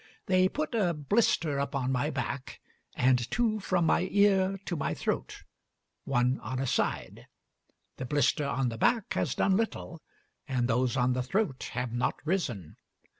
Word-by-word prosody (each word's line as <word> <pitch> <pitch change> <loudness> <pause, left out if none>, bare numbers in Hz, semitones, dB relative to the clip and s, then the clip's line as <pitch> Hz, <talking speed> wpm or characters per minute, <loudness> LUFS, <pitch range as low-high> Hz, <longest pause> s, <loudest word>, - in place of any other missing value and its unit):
They 185 -2 +3
put 305 +2 -3
a 190 -7 +1
blister 150 -3 +1
upon 140 -2 -1
my 135 +3 0
back, 140 -3 -4 0.4
and 125 -1 +2
two 225 -3 +1
from 185 -3 +1
my 175 +3 +2
ear 195 -1 +3
to 175 - -2
my 150 - -2
throat, - - -3 0.6
one 125 -1 +1
on 130 +4 -5
a 135 - -1
side. 125 - -2 0.7
The 130 - -4
blister 145 +2 +1
on 130 -1 0
the 115 -1 -6
back 230 - +2
has - - -1
done 190 - +2
little, 195 -6 -3 0.5
and 125 -3 0
those 125 +2 +1
on 125 0 +2
the 125 - -1
throat 140 - -1
have 125 -2 -3
not 120 +1 0
risen. 125 - -2
140 Hz, 160 wpm, -29 LUFS, 125-190 Hz, 0.7 s, They